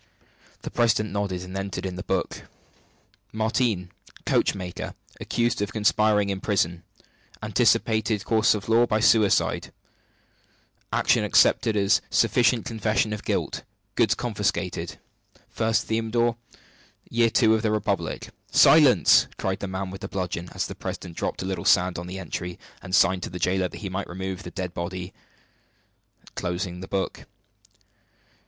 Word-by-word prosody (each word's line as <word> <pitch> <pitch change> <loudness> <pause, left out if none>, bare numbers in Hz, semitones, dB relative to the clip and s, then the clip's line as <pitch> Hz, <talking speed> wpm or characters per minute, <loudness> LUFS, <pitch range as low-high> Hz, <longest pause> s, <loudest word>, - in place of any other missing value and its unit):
The - - -5
president 110 -2 +1
nodded, 100 -3 -2
and 90 +1 -9
entered 95 0 -4
in 95 -1 -4
the 90 - -6
book: - - -3 0.9
"Martigne, 110 -4 0 0.4
coachmaker. 90 -2 -1 0.2
Accused 120 -2 -1
of 105 0 -2
conspiring 105 -1 +2
in 95 -1 -4
prison. 85 -5 0 0.6
Anticipated 110 -2 +1
course 110 -1 +3
of 105 - -6
law 115 +2 +4
by 110 - +1
suicide. 110 -2 +3 1.2
Action - - +2
accepted 110 -2 +3
as 100 -1 +3
sufficient 120 -1 +2
confession 110 -1 0
of 105 - -6
guilt. - - -2 0.3
Goods - - +2
confiscated. - - -2 0.6
1st 110 0 +1
Thermidor, 115 +1 0 0.7
year 115 0 +2
two 110 -1 +4
of 110 - +1
the 110 - 0
Republic." 100 -5 -2 0.2
"Silence!" 130 - +6
cried 95 +1 -2
the 100 - -4
man 95 0 -4
with 95 - -9
the 95 - -4
bludgeon, 90 -3 -4
as - - -1
the - - -6
president 85 -2 -7
dropped - - -3
a - - -4
little 95 -3 -3
sand 90 0 +3
on 90 - -7
the 95 +1 -6
entry, 90 0 -5 0.2
and 95 0 -2
signing 95 +1 +4
to - - -4
the 90 - -6
jailer 90 +1 +1
that - - -11
he 100 - -4
might 95 +1 -4
remove 95 +1 -5
the - - -8
dead 90 -3 -5
body, 90 +2 -5 1.2
closed 90 0 -4
the 95 - -7
book. 95 -1 -3
100 Hz, 145 wpm, -25 LUFS, 90-110 Hz, 1.2 s, Silence